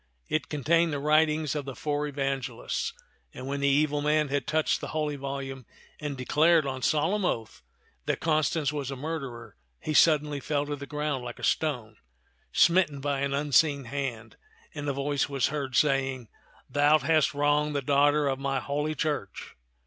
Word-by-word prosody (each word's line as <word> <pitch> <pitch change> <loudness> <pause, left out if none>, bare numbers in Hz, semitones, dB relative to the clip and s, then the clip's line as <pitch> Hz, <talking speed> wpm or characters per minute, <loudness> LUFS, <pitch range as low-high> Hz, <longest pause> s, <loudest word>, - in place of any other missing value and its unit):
It 155 - -1
contained 165 +3 +2
the 145 - -1
writ 155 +2 +4
ings 155 -2 -1
of 145 -2 -3
the 135 -2 -6
four 150 0 -2
Evangelists; 135 - -3 0.4
and - - -7
when 140 +1 -3
the 140 - +1
evil 145 +1 +2
man 150 0 +2
had 140 0 -1
touched 155 0 +1
the - - -4
holy 150 -1 -1
volume 135 -2 -6 0.3
and 145 -2 -4
declared 155 +5 +3
on 130 -1 -4
solemn 160 - +1
oath 115 -10 -2 0.5
that - - 0
Constance 155 -2 +1
was 140 -3 -3
a 135 - -4
murderer, 135 -5 -6 0.2
he 155 - -3
suddenly 150 -2 +4
fell 145 +1 -1
to 145 0 -3
the 140 0 -9
ground 150 -3 -2
like 120 -1 -7
a - - -12
stone, 120 -9 -1 0.5
smitten 170 -4 +3
by 140 0 -1
an 140 0 -1
unseen 145 0 +2
hand; 120 -3 -5 0.4
and 145 -1 -4
a - - 0
voice 140 +1 -1
was 135 -3 +1
heard 140 -4 -4
saying, 135 -4 +1 0.2
" - - -29
Thou 145 +2 +4
hast 155 0 +2
wronged 145 +1 +1
the 140 - -1
daughter 145 +2 +3
of 135 -1 -1
my 135 -1 -1
Holy 150 +4 -2
Church." 150 -2 -3
145 Hz, 180 wpm, -28 LUFS, 135-150 Hz, 0.5 s, writ